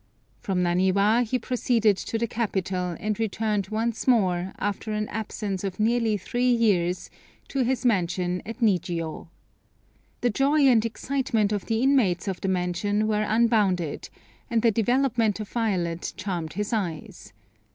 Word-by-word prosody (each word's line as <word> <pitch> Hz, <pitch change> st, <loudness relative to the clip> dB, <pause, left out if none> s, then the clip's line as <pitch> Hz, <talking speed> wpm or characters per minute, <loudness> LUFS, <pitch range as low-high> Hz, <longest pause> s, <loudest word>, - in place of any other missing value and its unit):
From 185 Hz, -2 st, -1 dB
Naniwa 190 Hz, +6 st, +3 dB
he 245 Hz, +2 st, -1 dB
proceeded 230 Hz, -3 st, +1 dB
to 225 Hz, -, -4 dB
the 230 Hz, -, 0 dB
capital, 190 Hz, -6 st, -2 dB
and 215 Hz, 0 st, -2 dB
returned 215 Hz, -2 st, -1 dB
once 225 Hz, +3 st, -2 dB
more, 190 Hz, -7 st, +2 dB
after 205 Hz, +2 st, -3 dB
an 210 Hz, 0 st, -1 dB
absence 210 Hz, -3 st, -4 dB
of 195 Hz, -1 st, -4 dB
nearly 225 Hz, -1 st, +2 dB
three 245 Hz, +6 st, -1 dB
years, 190 Hz, -7 st, +1 dB, 0.4 s
to 275 Hz, -, -1 dB
his 255 Hz, +1 st, -1 dB
mansion 180 Hz, -4 st, +1 dB
at 230 Hz, +4 st, -8 dB
Nijiô. 170 Hz, -7 st, 0 dB, 0.9 s
The 245 Hz, -, +2 dB
joy 280 Hz, +7 st, +2 dB
and 250 Hz, -6 st, +5 dB
excitement 230 Hz, -2 st, -1 dB
of 205 Hz, -2 st, -2 dB
the 225 Hz, +1 st, 0 dB
inmates 240 Hz, -11 st, +2 dB
of 190 Hz, -2 st, -3 dB
the -, -, -2 dB
mansion 190 Hz, +3 st, 0 dB
were 210 Hz, -1 st, +1 dB
unbounded, 210 Hz, -8 st, +1 dB, 0.4 s
and 230 Hz, -1 st, +1 dB
the 230 Hz, -, +5 dB
development 230 Hz, -1 st, +1 dB
of 215 Hz, -, -6 dB
Violet 180 Hz, -7 st, -1 dB
charmed 175 Hz, -5 st, -4 dB
his 210 Hz, +4 st, -3 dB
eyes. 175 Hz, -, -4 dB
210 Hz, 145 wpm, -25 LUFS, 185-230 Hz, 0.9 s, and